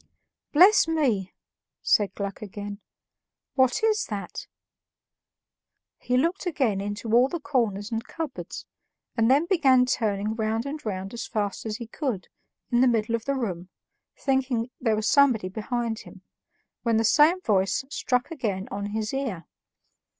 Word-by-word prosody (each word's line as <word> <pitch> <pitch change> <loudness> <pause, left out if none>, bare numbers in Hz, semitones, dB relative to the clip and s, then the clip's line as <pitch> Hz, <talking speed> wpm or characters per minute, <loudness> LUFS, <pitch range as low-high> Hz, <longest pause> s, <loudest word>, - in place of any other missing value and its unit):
"Bless 370 +5 +6
me!" 250 - +1 0.5
said 200 -2 +2
Gluck 200 -1 -5
again, 205 -1 -7 0.7
"what 260 - +2
is 435 -1 +2
that?" 205 -2 -6 1.5
He 250 0 0
looked 340 +8 0
again 255 - 0
into 205 +2 -4
all 245 +2 +6
the 345 - -3
corners 230 -8 -1
and 225 0 -2
cupboards, 320 -5 -6 0.5
and 225 -1 +3
then 280 +5 +4
began 270 -9 +4
turning 215 -4 0
round 220 +1 -1
and 295 +2 -5
round 195 -1 -4
as 235 0 -5
fast 210 -1 -2
as 215 -1 -3
he 235 - -6
could, 230 - -4 0.4
in 240 0 +4
the 260 - +6
middle 230 -2 +1
of 230 -1 -1
the 275 - 0
room, 185 -8 -3 0.5
thinking 260 -3 0
there 225 -3 +1
was 215 +1 -1
somebody 250 -9 +4
behind 225 +2 -3
him, 190 0 -13 0.6
when 230 -2 +2
the 225 - +2
same 305 - +5
voice 195 - +1
struck 250 -2 -1
again 210 -11 -3
on 200 0 -3
his 215 +2 -3
ear. 250 -11 -3
230 Hz, 150 wpm, -26 LUFS, 205-270 Hz, 1.5 s, Bless